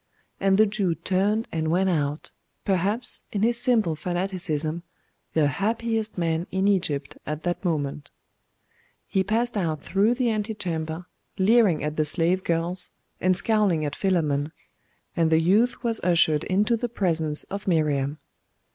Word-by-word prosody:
And 195 0 +3
the 215 - +6
Jew 200 -5 0
turned 205 +6 0
and 160 -1 -1
went 185 +4 +2
out, 150 -4 -1 0.3
perhaps, 200 +5 0
in 205 0 -1
his 235 +1 +3
simple 220 -10 +2
fanaticism, 175 -2 -2 0.5
the 155 -2 +3
happiest 225 +5 -1
man 165 0 -1
in 190 +1 0
Egypt 170 -8 0
at 150 +1 -4
that 175 +2 -2
moment. 150 -4 -2 1.0
He 190 -2 0
passed 230 +3 0
out 160 -7 -1
through 205 +6 +2
the 250 -1 +1
ante 215 0 -2
chamber, 165 -3 -3 0.3
leering 200 -4 +4
at 150 +1 -3
the 155 - +2
slave 175 +4 0
girls, 170 +2 0 0.3
and 185 0 +2
scowling 205 -9 +2
at 145 - -3
Philammon; 155 -6 0 0.6
and 165 -2 +2
the 160 - +5
youth 215 +11 +2
was 230 -2 0
ushered 165 -3 +3
into 210 +5 +2
the 240 +1 -3
presence 160 -8 0
of 200 0 -5
Miriam. 150 -4 +1
180 Hz, 145 wpm, -25 LUFS, 160-210 Hz, 1.0 s, the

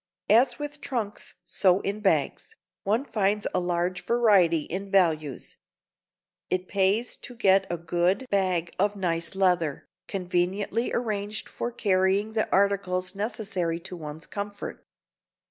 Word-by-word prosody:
As 245 +3 +5
with 295 0 -6
trunks, 225 -6 -4
so 185 -1 +3
in 200 +2 -3
bags, 215 - 0 0.3
one 220 +7 0
finds 210 -3 0
a - - +2
large 175 0 -1
variety 200 -9 +4
in 195 +6 -5
values. 160 -8 +1 0.9
It 185 0 -1
pays 200 +5 +1
to 245 - -9
get 195 -4 +4
a 175 - -1
good 175 +7 0
bag 185 -4 +1
of 205 +2 +2
nice 170 -2 -1
leather, 180 -6 +1 0.2
conveniently 195 +4 -1
arranged 215 -2 -2
for 240 - -4
carrying 200 -1 +1
the 220 -1 0
articles 190 -2 +1
necessary 195 -5 -2
to 185 +1 -6
one's 155 -1 -8
comfort. 205 0 -6
195 Hz, 130 wpm, -27 LUFS, 180-210 Hz, 0.9 s, As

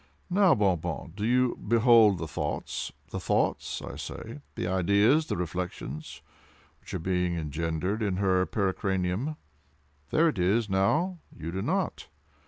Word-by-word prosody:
Now, 190 -4 +5
Bon 95 -6 +2
Bon, 80 - -5
do 105 - -4
you 125 0 +3
behold 115 -3 +5
the 80 -1 -4
thoughts—the - - -4
thoughts, - - 0
I - - -7
say,—the 70 +3 -7
ideas—the 100 - +3
reflections—which 80 -4 -7
are - - +1
being 90 0 0
engendered 80 +6 -2
in 100 -4 0
her 95 -2 +2
pericranium? 95 +5 -1 0.7
There 165 +2 +4
it 120 - -1
is, 105 +6 +2
now—you 100 - 0
do 95 +2 -3
not! - - -1
95 Hz, 120 wpm, -28 LUFS, 85-115 Hz, 0.7 s, Now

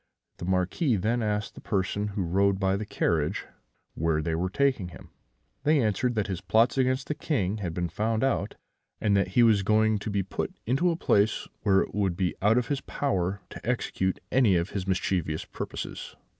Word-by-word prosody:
The - - -6
Marquis 95 - +1
then 115 +5 0
asked 105 -1 -1
the - - -12
person 100 +1 -1
who 100 -1 -2
rode 95 +3 +2
by 95 -1 +2
the 105 +1 -4
carriage 80 -6 0 0.5
where 80 -1 0
they 80 +1 -1
were 90 +3 0
taking 130 -3 +1
him: 90 - -13 0.5
they 150 0 +3
answered 120 +1 +1
that 105 -2 +1
his 95 -4 -4
plots 115 +3 +3
against 130 0 +1
the - - -2
King 110 - -1
had 90 -6 -4
been 90 -1 -1
found 110 +5 -1
out, 100 -7 0 0.4
and 105 -1 +2
that 100 0 +2
he 120 - +7
was 110 -3 +5
going 110 +1 +3
to 105 - -5
be 100 -1 0
put 95 - -4
into 135 +10 +2
a 170 - +1
place 105 -8 +2
where 95 -2 +4
it - - -4
would 95 -4 0
be 95 -2 0
out 105 +4 +4
of 125 - 0
his 140 -2 -1
power 95 -8 -1
to - - -9
execute 100 -6 -1
any 120 -8 +4
of 85 +2 0
his 95 -2 -3
mischievous 90 -4 -1
purposes. - - -6
100 Hz, 200 wpm, -27 LUFS, 95-115 Hz, 0.5 s, he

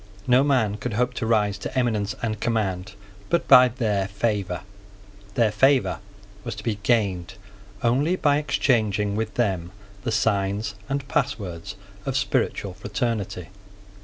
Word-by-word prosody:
No 125 +2 +5
man 120 -8 +2
could 110 +2 -4
hope 125 +3 +1
to 115 - -3
rise 105 -3 +2
to 130 - -5
eminence 110 -5 0
and 110 -2 -1
command 100 -4 -1 0.4
but 170 - +1
by 125 0 +9
their 110 -6 -1
favour. 100 -3 -1 0.7
Their 115 -3 +3
favour 135 +5 +3 0.4
was - - -4
to 105 - -9
be 105 -3 -2
gained 95 -5 0 0.5
only 135 +9 +2
by 145 -5 +3
exchanging 105 -8 +1
with 110 0 -3
them 95 -7 0 0.3
the 115 - -1
signs 105 0 0 0.2
and 140 0 -2
passwords 100 - -2 0.3
of 135 +2 -1
spiritual 125 -7 0
fraternity. 105 -2 -3
110 Hz, 135 wpm, -24 LUFS, 100-125 Hz, 0.7 s, by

